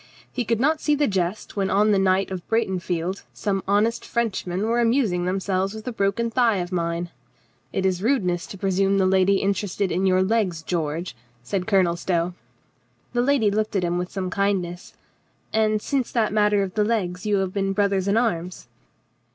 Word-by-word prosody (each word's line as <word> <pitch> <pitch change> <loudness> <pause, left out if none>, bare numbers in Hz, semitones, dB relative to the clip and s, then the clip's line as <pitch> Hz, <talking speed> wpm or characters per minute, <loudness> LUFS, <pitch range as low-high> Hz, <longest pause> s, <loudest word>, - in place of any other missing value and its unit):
"He 245 - -2
could 230 0 0
not 305 +5 +2
see 300 - +2
the 290 0 +2
jest 190 -1 -2
when 195 -2 0
on 210 +2 +3
the 200 - +3
night 190 0 +2
of 180 -2 -6
Breitenfeld 185 -4 -1
some 195 -2 -1
honest 210 +4 +2
Frenchmen 195 -5 -2
were 230 +2 +1
amusing 230 -7 +2
themselves 190 +1 -1
with 220 +2 -9
a - - -1
broken 225 +2 0
thigh 230 -3 +3
of 175 0 -3
mine." 170 -1 -2 0.6
"It 190 - -1
is 185 -1 +1
a - - -3
rudeness 180 -10 +1
to 195 - -9
presume 195 +1 +1
the 190 - +3
lady 190 +1 +4
interested 200 -1 -1
in 190 +3 +1
your 185 0 +3
legs, 190 -6 0
George," 160 -2 -3 0.3
said 180 +7 -3
Colonel 185 -5 +3
Stow. 175 0 -1 0.8
The 240 - +2
lady 245 -5 +3
looked 215 +1 -1
at 190 - +1
him 175 0 0
with 180 0 -4
some 185 -2 -3
kindness. 185 -3 -2 0.6
"And 215 -1 +2
since 270 -4 -1
that 220 -3 +1
matter 210 -1 +3
of 185 -2 -5
the 210 - +2
legs 200 -4 -1
you 205 - +2
have 190 -1 -1
been 195 -1 0
brothers 200 -1 +1
in 200 +2 +2
arms?" 185 -7 -2
195 Hz, 190 wpm, -23 LUFS, 180-215 Hz, 0.8 s, lady